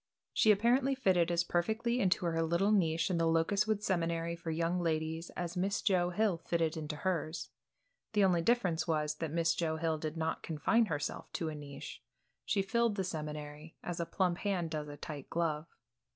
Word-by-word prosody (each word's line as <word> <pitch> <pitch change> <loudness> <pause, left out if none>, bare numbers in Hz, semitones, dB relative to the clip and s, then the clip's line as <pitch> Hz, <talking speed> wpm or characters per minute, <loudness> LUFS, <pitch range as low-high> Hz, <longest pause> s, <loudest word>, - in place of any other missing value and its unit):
She 215 - +5
apparently 250 +6 +3
fitted 185 -9 +3
as 170 0 +2
perfectly 220 +8 0
into 185 -3 +2
her 165 -1 +1
little 170 +5 +2
niche 170 -4 +2
in 170 - +1
the 165 - +3
Locustwood 200 +6 +2
Seminary 170 -3 0
for 170 -1 -7
young 165 +2 0
ladies 160 0 -1
as 175 0 -3
Miss 195 +3 0
Joe 180 -4 +2
Hill 195 -2 +1
fitted 165 -2 0
into 155 -1 -4
hers. 165 -1 -2 0.6
The 205 -2 +4
only 180 -3 +4
difference 180 -6 +1
was 150 -2 0
that 165 - -3
Miss 165 +1 +2
Joe 160 -2 -1
Hill 160 -1 -1
did 155 +1 -4
not 160 0 -1
confine 215 +9 +2
herself 145 -5 -3
to 165 - -2
a 155 - -5
niche; 140 -1 -8 0.4
she 200 -2 +1
filled 235 +1 +1
the 195 - -1
seminary, 150 -2 -6
as 175 -1 -4
a 170 - -2
plump 180 -2 0
hand 180 -5 -1
does 150 -2 -3
a 145 0 -8
tight 145 -1 -7
glove. 160 -2 -1
170 Hz, 185 wpm, -33 LUFS, 160-195 Hz, 0.6 s, She